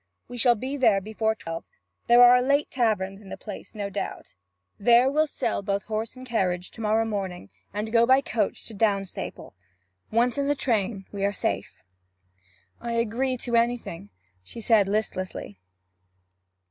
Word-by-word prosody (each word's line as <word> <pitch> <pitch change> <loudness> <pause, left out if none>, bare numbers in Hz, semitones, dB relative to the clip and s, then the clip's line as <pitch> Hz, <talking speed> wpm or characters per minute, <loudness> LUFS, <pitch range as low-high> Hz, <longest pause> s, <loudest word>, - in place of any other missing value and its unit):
We 245 0 -8
shall 240 0 +5
be 260 +6 -4
there 225 -7 +4
before 220 +2 -1
twelve, 165 -5 -6
and 90 0 -44
there - - +10
are 250 +1 +6
late 280 +3 +1
taverns 210 -5 0
in 195 - -13
the - - -6
place, 210 0 -9
no 200 -1 -4
doubt. 200 - -5 0.5
There 240 +5 +5
we'll 310 +2 +2
sell - - -2
both 200 0 -1
horse 220 +2 -4
and 255 0 -10
carriage 185 -7 -1
to 225 - -10
morrow 220 +1 +2
morning; 190 - -4 0.2
and 210 +2 -4
go 230 0 +5
by 260 +1 +7
the 275 - -3
coach 215 -4 -1
to 225 - -5
Downstaple. 200 -2 -2 0.6
Once 240 +3 +1
in 280 - 0
the 290 - +2
train 215 -6 -1
we 200 -1 -4
are 200 - +2
safe.' 205 - -3 1.0
'I 235 0 -4
agree 235 +3 0
to 235 0 -2
anything,' 230 - -1 0.3
she 95 - -10
said 220 -3 +4
listlessly. 185 - -3
220 Hz, 170 wpm, -26 LUFS, 195-240 Hz, 1.0 s, there